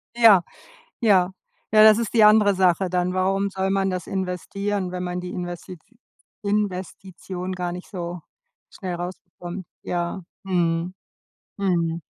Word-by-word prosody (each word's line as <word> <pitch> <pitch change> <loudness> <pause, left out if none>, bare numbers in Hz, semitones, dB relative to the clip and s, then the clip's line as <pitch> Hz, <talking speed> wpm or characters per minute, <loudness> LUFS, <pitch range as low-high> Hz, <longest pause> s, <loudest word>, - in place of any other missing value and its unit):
Ja, 220 -6 +7 0.6
ja. 190 -5 +4 0.4
Ja, 215 0 +7
das 215 0 +8
ist 230 -1 -3
die 220 -2 +6
andere 210 -2 +6
Sache 185 0 +2
dann. 180 0 0
Warum 195 +1 +1
soll 190 0 -1
man 195 -1 +1
das 180 -2 -4
investieren, 190 +1 -3
wenn 180 0 -4
man 180 0 -3
die 180 - -6
Investi 175 0 -6 0.6
Investition 190 -2 -3
gar 180 -1 -3
nicht 180 +1 -8
so 175 -2 -5 0.5
schnell 185 -3 -5
rausbekommt? 175 0 -7 0.2
Ja, 175 +2 -3 0.2
mhm, 175 -1 0 0.6
mhm. 170 -4 0
185 Hz, 135 wpm, -23 LUFS, 180-195 Hz, 0.6 s, das